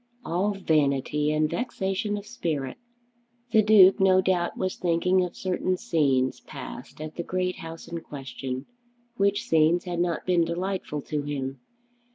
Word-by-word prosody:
"All 190 +5 0
vanity; 150 -4 +1
and 155 0 +2
vexation 205 0 -2
of 205 - -7
spirit!" 155 - -3 0.7
The 220 - +6
Duke 200 -3 +7
no 190 -1 +5
doubt 185 -2 0
was 185 0 -1
thinking 180 +2 +2
of 180 - -5
certain 185 0 -1
scenes 135 -7 +1
passed - - -9
at 155 0 -7
the 170 - -2
great 185 +1 -1
house 165 0 -8
in 170 0 -4
question, 135 -3 -6 0.5
which 200 0 +1
scenes 160 +2 +4
had 175 -2 -3
not 175 -2 -1
been 180 -2 +3
delightful 170 -3 -3
to 150 -1 -2
him. 135 -2 -4
170 Hz, 150 wpm, -26 LUFS, 150-185 Hz, 0.7 s, Duke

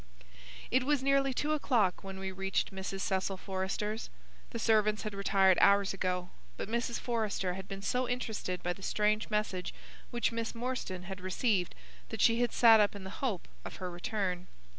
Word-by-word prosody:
It 255 +1 +4
was 285 0 +1
nearly 275 0 +3
two 295 +4 0
o'clock 235 - +1
when 195 0 -6
we 190 0 -4
reached 195 +1 -1
Mrs. 190 0 -4
Cecil 190 0 0
Forrester's. 195 +3 -3 0.4
The 235 - -5
servants 215 -2 +3
had 215 -1 -4
retired 195 -2 +4
hours 200 0 +5
ago, 180 -1 -2 0.3
but - - -4
Mrs. 235 +2 -1
Forrester 215 -6 -1
had 190 +1 -7
been 195 0 -6
so 250 +4 0
interested 220 -7 -3
by 175 - 0
the 195 - -15
strange 210 +2 +1
message 210 -4 -1 0.3
which 240 -2 0
Miss 230 0 -3
Morstan 230 -7 -3
had 190 0 -7
received 185 0 0 0.3
that - - -5
she 230 +1 +4
had 240 - +2
sat 225 -2 +7
up 205 -1 +3
in 200 - -7
the 190 - -7
hope 225 -10 -1 0.2
of - - -7
her 180 -1 -5
return. 180 0 -2
200 Hz, 180 wpm, -32 LUFS, 190-230 Hz, 0.4 s, sat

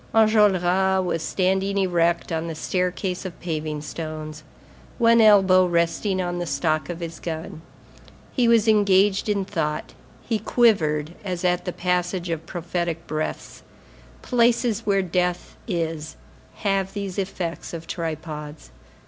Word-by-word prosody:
Enjolras 190 -4 +3
was 165 -2 -1
standing 190 +4 0
erect 175 -3 +1
on 165 0 -2
the 165 - -5
staircase 180 +2 -2
of 185 -3 -7
paving 155 -3 -3
stones, 155 -1 -6 0.6
one 230 -1 +5
elbow 195 -4 +6
resting 175 +3 0
on 175 -1 -2
the 175 - -3
stock 155 +1 0
of 175 0 -5
his 165 -2 -6
gun. 160 -1 -6 0.7
He 245 -3 +2
was 230 -1 +4
engaged 200 -1 +3
in 200 -2 0
thought; 155 -6 -3 0.3
he 225 -2 0
quivered, 170 -10 +2
as 180 -2 -3
at 180 0 +1
the 180 - -2
passage 180 0 -1
of 165 -1 -4
prophetic 170 -1 -3
breaths; 155 +1 -4 0.6
places 235 -2 +2
where 195 -1 +3
death 180 0 -1
is 165 -5 -3 0.4
have 195 -2 -1
these 200 -2 -4
effects 185 -3 -4
of 165 -1 -7
tripods. 155 - -6
180 Hz, 130 wpm, -23 LUFS, 165-195 Hz, 0.7 s, elbow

